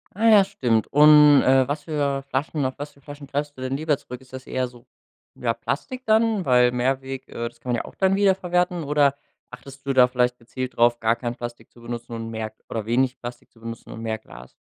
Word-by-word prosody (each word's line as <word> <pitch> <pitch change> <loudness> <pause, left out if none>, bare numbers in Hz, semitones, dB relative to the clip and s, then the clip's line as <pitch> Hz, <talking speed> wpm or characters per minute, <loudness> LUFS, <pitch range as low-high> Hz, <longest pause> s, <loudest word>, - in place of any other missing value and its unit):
Ah 225 +3 +2
ja, 210 -3 +7
stimmt. 125 - 0
Und, 150 -1 +7
äh, 130 0 +4
was 145 +1 -3
für 140 -3 -1
Flaschen 140 +2 -2
auf 130 - -1
was 145 +1 -6
für 140 - -24
Flaschen 145 0 -10
greifst 145 +1 -3
du 130 - -11
denn 130 +1 -2
lieber 155 0 +1
zurück? 125 -2 -10
Ist 130 0 -20
das 130 0 -9
eher 130 -1 -1
so, 120 -1 -17 0.5
ja, 115 -2 -1
Plastik 255 - -4
dann, 220 -3 +2
weil 125 -1 +4
Mehrweg, 130 +1 -2
äh, 115 0 -4
das 115 - -13
kann 125 +1 -5
man - - +2
ja - - -4
auch - - -11
dann 190 0 +2
wieder 200 -1 +4
verwerten 180 -1 -1
oder 145 -1 +2 0.4
achtest 135 0 -12
du 135 - 0
da 125 -1 +6
vielleicht 125 0 0
gezielt 125 +1 -6
drauf, 120 0 +4
gar 115 +1 +2
kein 120 0 -4
Plastik 120 0 -8
zu 120 - -18
benutzen 120 0 -7
und 115 0 -5
mehr 110 -1 -4 0.2
oder 110 -2 -4
wenig 125 +2 +1
Plastik 120 0 -9
zu 115 - -23
benutzen 115 0 -8
und 110 - -8
mehr 110 -1 -2
Glas? 60 - -14
130 Hz, 235 wpm, -23 LUFS, 120-150 Hz, 0.5 s, ja